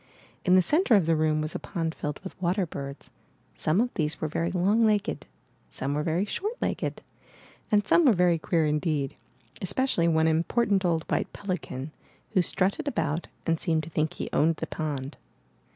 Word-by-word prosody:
In 180 - +5
the 185 - +6
center 295 - +4
of 195 -5 +4
the 165 0 +3
room 155 0 +1
was 155 +1 -4
a - - -3
pond 165 -4 -3
filled 150 -2 -4
with 190 - -8
water 185 +2 +1
birds. 140 -3 -8 0.4
Some 155 +5 +1
of 245 +2 +1
these 155 -1 0
were 155 - -1
very 165 +3 -1
long 195 +5 +2
legged, 210 -7 +1 0.4
some 135 +2 -3
were 150 - 0
very 165 +5 0
short 410 - -3
legged, - - -2 0.7
and 205 -1 +3
some 340 - +4
were 245 - +7
very 175 -3 +3
queer 165 -1 +1
indeed, 150 -2 0 0.5
especially 190 -3 +1
one 160 -1 +3
important 190 +5 +2
old 165 -3 +1
white - - -1
pelican, 170 -8 -4 0.4
who 195 -4 +3
strutted 195 - 0
about 175 - -1 0.2
and 165 -1 +1
seemed 160 -2 +1
to 165 - -9
think 155 0 0
he - - -5
owned 160 +2 +3
the - - -4
pond. 145 -3 -4
170 Hz, 185 wpm, -27 LUFS, 155-200 Hz, 0.7 s, were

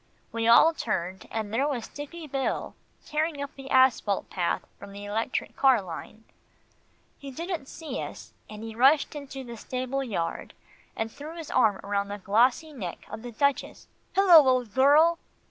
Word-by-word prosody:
We 230 0 -1
all 300 +8 +7
turned, 190 - -3
and 220 -1 -4
there 270 +5 +2
was 255 -6 -3
Dicky 310 +3 -8
Bill 270 -2 -2 0.3
tearing 305 0 -1
up 280 0 -5
the 270 -1 -10
asphalt 260 -7 +3
path 175 -2 -1 0.2
from 200 0 -11
the 200 +1 -8
electric 220 +4 -2
car 265 -4 +5
line. 195 +4 -9 1.0
He 280 - -8
didn't 325 +1 -5
see 320 +1 -6
us, - - -9 0.2
and 215 0 -9
he 225 0 -6
rushed 275 +7 +4
into 280 -2 -7
the 235 -2 -8
stable 255 +4 -3
yard, 190 -9 -4 0.4
and 225 0 -3
threw 305 +6 -9
his 325 -3 -7
arm 220 -6 +3
round 200 0 -1
the 205 - -4
glossy 245 +10 +2
neck 190 -11 -7
of 220 +1 -6
the 240 +1 -7
Duchess 280 +4 -1 0.3
"Hello! 350 -7 +8
old 250 -4 +1
girl." 300 +6 +5
255 Hz, 165 wpm, -27 LUFS, 215-285 Hz, 1.0 s, Hello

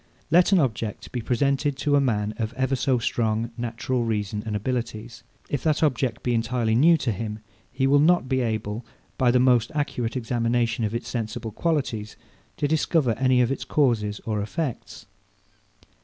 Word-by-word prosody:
Let 175 +4 +5
an 195 - +6
object 115 - -2
be 125 - -3
presented 135 +4 0
to 145 0 +1
a 140 - +4
man 105 -5 0
of 110 0 -3
ever 130 +1 0
so 130 0 +1
strong 115 -1 -1
natural 120 +1 -2
reason 105 -2 -2
and 105 - -2
abilities; 115 0 -4 0.3
if 145 - -2
that 155 +2 +1
object 130 -5 0
be 120 - 0
entirely 115 -1 0
new 160 +8 +5
to 120 - -1
him, 105 +1 -4 0.3
he 130 +1 0
will 140 +1 +5
not 165 -2 +4
be 130 0 +1
able, 110 -1 -2 0.4
by 125 - +4
the 125 +1 +4
most 125 -1 +3
accurate 130 -5 -2
examination 115 -1 0
of 110 +2 -3
its 120 - -4
sensible 115 -1 -4
qualities, 120 -7 -2 0.4
to 145 - 0
discover 155 -3 +2
any 130 -1 +4
of 125 +1 +2
its 135 - -2
causes 110 -8 +1
or 110 -2 -1
effects. 120 +1 -5
120 Hz, 170 wpm, -25 LUFS, 110-135 Hz, 0.4 s, an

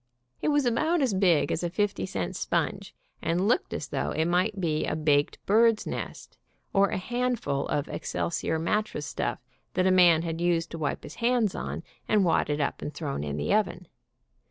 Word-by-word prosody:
It - - -1
was 290 -2 +3
about 310 +9 +2
as 250 -6 +1
big 185 -5 +3
as - - -1
a 175 - 0
fifty 195 - -1
cent 90 -3 -3
sponge, - - -2 0.3
and 175 +4 +1
looked 245 - +1
as - - -4
though - - -1
it 160 - 0
might 185 +4 +1
be 155 -4 0
a - - -1
baked 150 -2 +2
bird's 225 +1 +4
nest - - -6 0.3
or 200 0 +4
a - - -2
hand 245 +4 -1
ful 140 -1 -2
of 145 0 -1
excelsior 165 -1 -2
mat 210 +7 +1
tress 150 -8 -6
stuff - - -2 0.4
that 185 0 +2
a 190 - +4
man 175 -3 +6
had 165 0 -3
used 170 -1 +1
to 165 - -6
wipe 145 -2 -2
his - - -9
hands 235 -4 +2
on, - - -5 0.2
and 210 -3 +3
wadded 150 -3 +1
up 145 - -1
and 150 - -5
thrown 140 - -3
in 75 -1 -3
the 75 - 0
oven. 185 -4 0
180 Hz, 200 wpm, -27 LUFS, 155-215 Hz, 0.4 s, man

